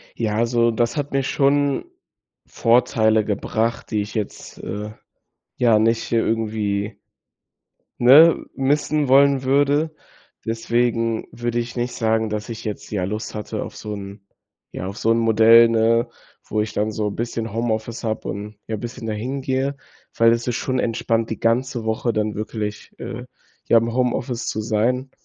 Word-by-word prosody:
Ja. 110 -2 -1
Also, 115 +1 +2
das 115 +3 0
hat 145 -1 -3
mir 135 0 +1
schon 140 +1 +1 0.6
Vorteile 110 -2 +2
gebracht, 110 +3 -2
die 105 -2 0
ich 105 +1 -8
jetzt, 105 -3 -5
äh, 105 +1 -5 0.6
ja, 115 -3 +4
nicht 115 +1 +1
irgendwie 110 -2 -1 1.0
ne, 145 +7 +8 0.2
missen 145 +1 +1
wollen 140 0 +5
würde. 145 +4 +2 0.5
Deswegen 115 0 0
würde 120 0 -2
ich 120 0 -3
nicht 120 0 -2
sagen, 110 -1 0
dass 105 0 -4
ich 115 -1 -6
jetzt, 105 -2 -6
ja, 100 -3 -1
Lust 105 +4 -4
hatte 105 -1 -4
auf - - -9
so 105 - -6
'n 100 0 -9 0.5
ja, 95 - -6
auf 100 +2 -6
so 115 - 0
'n 115 - +3
Modell, 115 +1 +6
ne, 115 +1 +2 0.4
wo 110 - -2
ich 110 0 -2
dann 105 +1 -1
so 105 -1 -2
bisschen 115 0 -4
Homeoffice 115 +1 -2
habe 110 -1 -3
und, 105 +2 -6
ja, 110 - -2
bisschen 120 +1 -7
dahin 125 +6 -3
gehe, 135 +1 -1 0.4
weil 115 0 +5
es 115 0 -1
ist 125 - -1
schon 130 +2 -1
entspannt, 115 -1 0
die 110 - -4
ganze 120 +1 0
Woche 110 +2 -1
dann 105 -1 -1
wirklich, 105 0 -5
äh, - - -6 0.4
ja, 115 - +6
im 115 +1 -1
Homeoffice 125 0 -1
zu 110 - -2
sein. 120 +4 0
115 Hz, 160 wpm, -22 LUFS, 110-125 Hz, 1.0 s, ne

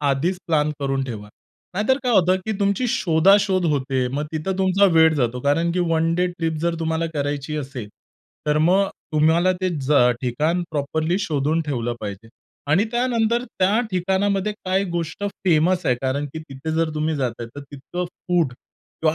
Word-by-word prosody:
आधीच 145 +6 0
प्लॅन 155 -2 +2
करून 135 -1 0
ठेवा. 105 -5 -7 0.5
नाहीतर 220 +7 +2
काय 250 -1 +1
होतं, 185 -2 +4
की 220 - 0
तुमची 200 +5 +1
शोधा-शोध 190 -2 +3
होते. 130 -2 0
मग 145 +4 -2
तिथं 180 +5 -2
तुमचा 190 +1 +3
वेळ 160 -1 +6
जातो 125 -2 0
कारण, 165 +5 +1
की 180 - -1
1 165 +1 +2
डे 180 +1 +2
ट्रिप 165 -2 -2
जर 170 0 0
तुम्हाला 160 +1 0
करायची 145 +1 -2
असेल, 130 -7 -5 0.6
तर 150 0 +2
मग 185 +5 +4 0.3
तुम्हाला 165 +4 +3
ते 185 - +1
ज 135 +3 -1 0.3
ठिकाण 155 +8 0
प्रॉपरली 160 +4 -1
शोधून 155 -3 0
ठेवलं 120 -5 -2
पाहिजे. 105 +1 -7 0.4
आणि 185 +8 +4
त्यानंतर 240 -1 +1
त्या 200 +1 +1
ठिकाणामध्ये 195 +2 0
काय 190 -1 -1
गोष्ट 170 +3 -3 0.2
फेमस 175 +1 +3
आहे 125 - +4
कारण, 135 +3 -2
की - - -3
तिथे 135 +4 -6
जर 160 0 +1
तुम्ही 155 +1 0
जात 130 -4 -1
आहे, 115 - -5
तर - - -5
तितकं 145 +6 -6 0.2
फूड 170 -8 +2 0.5
किंवा 155 0 +3
160 Hz, 170 wpm, -22 LUFS, 140-185 Hz, 0.6 s, वेळ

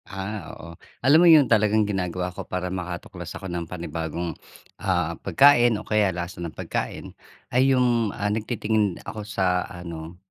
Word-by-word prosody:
Ah, 95 +2 -5 0.2
oo. - - -11 0.4
Alam 140 +4 +7
mo 175 - +6
yun 145 -3 +6
talagang 110 0 +4
ginagawa 90 -2 -2
ko - - -5
para 90 0 -2
makatuklas 90 -1 -7
ako - - -10
ng 85 -2 -4
panibagong, 85 0 -4 0.5
ah, - - 0
pagkain 120 -4 +5
o 105 - -8
kaya 105 -2 +3
lasa 85 +1 -5
ng 85 - -3
pagkain, - - -4 0.5
ay 125 - +4
yung 120 -4 +2 0.2
nagtitingin 110 -3 0
ako 110 - -6
sa 90 -2 +2
ano 85 -2 -8
95 Hz, 150 wpm, -24 LUFS, 85-110 Hz, 0.5 s, Alam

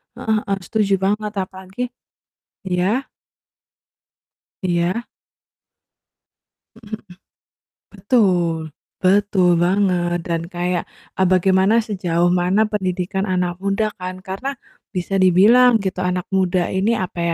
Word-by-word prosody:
Heeh 220 0 -1
heeh, 195 0 0
setuju 210 -3 0
banget 210 +1 0
apalagi 190 +4 -10 0.9
iya? 190 +9 0 1.6
Iya. 180 +5 0 1.7
Mhm 225 -1 -9
mhm. 215 - -7 0.9
Betul. 190 -5 +1 0.5
Betul 190 -1 +3 0.2
banget 180 -2 +1
dan 165 -1 -1
kayak, 175 0 -1 0.3
eee, 190 - +3
bagaimana, 190 +3 +3
sejauh 175 -4 0
mana 185 +4 +2
pendidikan 190 0 -2
anak 180 -1 0
muda 200 +2 0
kan, 185 0 -4
karena 195 +9 -3 0.4
bisa 180 +1 -3
dibilang 225 +7 +6
gitu 185 -1 -2
anak 180 -1 -1
muda 185 -2 +1
ini 200 +5 +1
apa 180 -1 -4
190 Hz, 105 wpm, -20 LUFS, 180-205 Hz, 1.7 s, dibilang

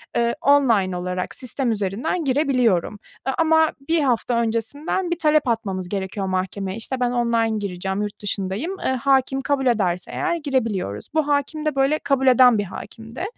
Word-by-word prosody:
eee, 235 0 +1
online 230 -10 +3
olarak 180 0 -3
sistem 255 0 -2
üzerinden 215 - -2
girebiliyorum. 250 - +1 0.3
Eee, 265 - +1
ama 320 -1 +4 0.2
1 330 - +3
hafta 245 -2 +1
öncesinden 235 - -2
bir 345 - -1
talep 305 -3 +3
atmamız 195 -6 -2
gerekiyor 195 0 -3
mahkemeye, 190 +1 -3
işte 255 +3 -4
ben 245 -1 +1
online 230 -2 +1
gireceğim 190 -1 -3
yurt 210 0 -5
dışındayım. 205 - -3
Eee, - - -1
hâkim 270 +1 +1
kabul 275 -1 0
ederse 190 -7 0
eğer 360 -2 -1
girebiliyoruz. 230 - -2
Bu 310 -2 +1
hâkim 295 +2 -1
de 305 - 0
böyle 275 +3 +2
kabul 270 -1 +1
eden 250 -2 +6
bir 205 - 0
hâkimdi. 225 - -8
240 Hz, 160 wpm, -22 LUFS, 200-280 Hz, 0.3 s, eden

